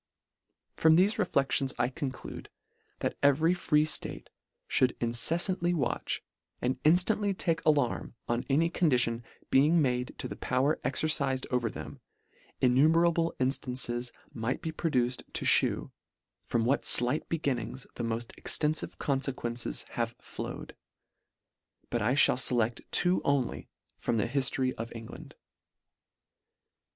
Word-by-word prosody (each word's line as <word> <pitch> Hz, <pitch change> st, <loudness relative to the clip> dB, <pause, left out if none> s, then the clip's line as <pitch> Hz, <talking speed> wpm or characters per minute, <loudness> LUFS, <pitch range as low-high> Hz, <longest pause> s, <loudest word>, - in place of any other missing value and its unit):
From 160 Hz, 0 st, +4 dB
thefe 205 Hz, +6 st, +3 dB
reflections 140 Hz, -7 st, +1 dB
I 120 Hz, -, +1 dB
conclude, 130 Hz, -1 st, -6 dB, 0.5 s
that -, -, -2 dB
every 145 Hz, +5 st, +4 dB
free 150 Hz, -4 st, +2 dB
ftate 155 Hz, -, -2 dB, 0.4 s
fhould 130 Hz, -1 st, +2 dB
inceflantly 170 Hz, -, +1 dB
watch, 135 Hz, -7 st, -2 dB, 0.4 s
and 125 Hz, +1 st, -2 dB
inftantly 190 Hz, +5 st, +2 dB
take 165 Hz, -2 st, 0 dB
alarm 145 Hz, -6 st, +1 dB
on 120 Hz, +1 st, -1 dB
any 165 Hz, +5 st, +2 dB
condition 125 Hz, -9 st, +2 dB, 0.3 s
being 150 Hz, +6 st, +5 dB
made 125 Hz, -3 st, 0 dB
to -, -, -4 dB
the -, -, -7 dB
power 135 Hz, +4 st, 0 dB
exercifed 140 Hz, -4 st, 0 dB
over 125 Hz, -2 st, +1 dB
them, -, -, -9 dB, 0.6 s
in 125 Hz, -1 st, +3 dB
numerable 165 Hz, +4 st, +3 dB
inftances 125 Hz, -2 st, 0 dB, 0.2 s
might 115 Hz, +2 st, -2 dB
be 160 Hz, -, -2 dB
produced 130 Hz, -6 st, 0 dB
to -, -, -1 dB
fhew, -, -, +2 dB, 0.5 s
from 115 Hz, -1 st, -1 dB
what 135 Hz, +4 st, +1 dB
flight 125 Hz, +5 st, +4 dB
beginnings 135 Hz, -5 st, -2 dB
the 120 Hz, -, -5 dB
moft 115 Hz, 0 st, -3 dB
extenlive 155 Hz, 0 st, 0 dB
confequences 130 Hz, -4 st, -2 dB
have 115 Hz, 0 st, -3 dB
flowed: -, -, -8 dB, 1.2 s
but 120 Hz, -, 0 dB
I 110 Hz, +5 st, +2 dB
(hall 140 Hz, -, +5 dB
feleft 120 Hz, -2 st, 0 dB
two 180 Hz, +1 st, +3 dB
only 140 Hz, -4 st, -1 dB, 0.3 s
from 115 Hz, -, -1 dB
the 110 Hz, -, +1 dB
hiftory 130 Hz, 0 st, 0 dB
of 115 Hz, 0 st, -5 dB
England. 115 Hz, -1 st, -10 dB
135 Hz, 125 wpm, -29 LUFS, 120-160 Hz, 1.2 s, being